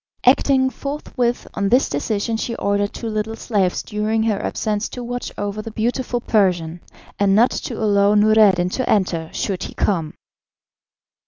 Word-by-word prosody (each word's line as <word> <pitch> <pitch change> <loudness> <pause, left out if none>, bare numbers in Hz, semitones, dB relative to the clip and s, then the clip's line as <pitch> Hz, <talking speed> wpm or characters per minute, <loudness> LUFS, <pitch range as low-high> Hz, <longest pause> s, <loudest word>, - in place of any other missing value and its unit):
Acting 260 0 +4
forthwith 255 -4 -3
on 200 -1 -1
this 250 +5 +4
decision 205 +9 -2
she 230 +1 -3
ordered 200 -1 0
two 230 - -6
little 215 0 -2
slaves 200 -6 0
during 215 +1 -1
her 215 -3 0
absence 210 0 -2
to 245 - -7
watch 245 +1 -4
over 205 +1 -3
the 225 - -7
beautiful 240 +3 -1
Persian, 180 -7 0 0.4
and 200 -1 +3
not 235 +4 +5
to 240 - -4
allow 205 -1 +3
Noureddin 205 -4 +4
to 255 +7 -2
enter 170 -6 +1
should 190 -3 -3
he - - -6
come. 165 -6 -1
215 Hz, 155 wpm, -20 LUFS, 200-235 Hz, 0.4 s, not